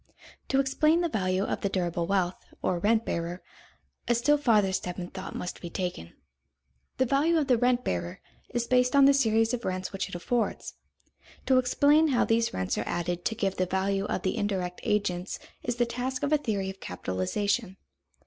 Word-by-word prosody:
To 270 - +2
explain 305 +5 +3
the 340 - 0
value 185 -5 0
of - - -2
the 200 - 0
durable 175 -3 -1
wealth, 185 -2 0 0.2
or 175 - +1
rent 220 +4 +2
bearer, 170 +2 -3 0.6
a 240 - +3
still 295 +5 +3
farther 210 -8 +3
step 180 -1 -3
in 180 -1 -5
thought 190 -1 -7
must 180 - -5
be 175 - -6
taken. 175 - -4 0.8
The 260 - +3
value 290 +6 +2
of 305 - +2
the 250 -4 +3
rent 250 0 +2
bearer 85 -1 -3 0.3
is 240 -1 -1
based 250 +1 +2
on 280 -1 +7
the 280 - +7
series 225 -4 +2
of 240 -1 -2
rents 185 +1 -3
which 195 - -3
it - - -7
affords. 230 +7 -2 0.7
To 260 -1 +5
explain 285 +5 +4
how 260 -5 +2
these 230 0 +2
rents 95 0 -2
are - - -3
added 175 0 -2
to 225 - 0
give 195 -4 -1
the 185 - +1
value 195 +2 0
of - - -2
the 185 - -1
indirect 185 -3 -2
agents 190 -3 -1 0.2
is 245 - -2
the 240 0 +2
task 250 +3 -3
of 290 +1 +1
a - - +6
theory 200 -7 -2
of 195 - -15
capitalization. 185 - -2
210 Hz, 195 wpm, -28 LUFS, 185-250 Hz, 0.8 s, on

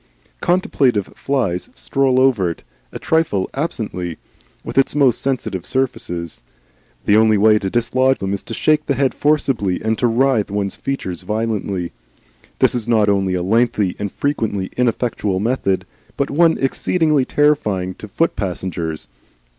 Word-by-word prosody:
Contemplative 135 - +1
flies 115 -11 -1
stroll 135 -2 +1
over 120 -9 +3
it, 85 - -7 0.3
and - - -7
trifle 160 -13 +1
absently 105 - -3 0.5
with - - -7
its 135 +1 +3
most 135 -5 +3
sensitive 125 -9 -2
surfaces. 90 - -2 0.6
The 100 - +4
only 110 -1 +5
way 105 +1 +5
to 95 - -2
dislodge 130 +4 +2
them 95 0 -3
is 100 - -3
to 115 - -5
shake 155 +4 +2
the 140 - +1
head 135 0 +1
forcibly 135 -11 +1
and 110 0 0
to 120 - +3
writhe 120 -2 +2
one's 100 -1 -2
features 95 -11 -4
violently. 100 -3 -2 0.7
This - - +3
is 120 -2 -2
not 110 -3 +3
only 95 -2 +1
a 90 - -1
lengthy 105 -1 +1
and 100 -1 -3
frequently 110 -9 -2
ineffectual 115 -5 0
method, 105 -3 0 0.3
but 140 - -1
one 165 +3 +4
exceedingly 150 +1 +1
terrifying 105 -12 +1
to 105 - -8
foot 165 +11 0
passengers. 85 -4 -4
110 Hz, 145 wpm, -19 LUFS, 95-135 Hz, 0.7 s, only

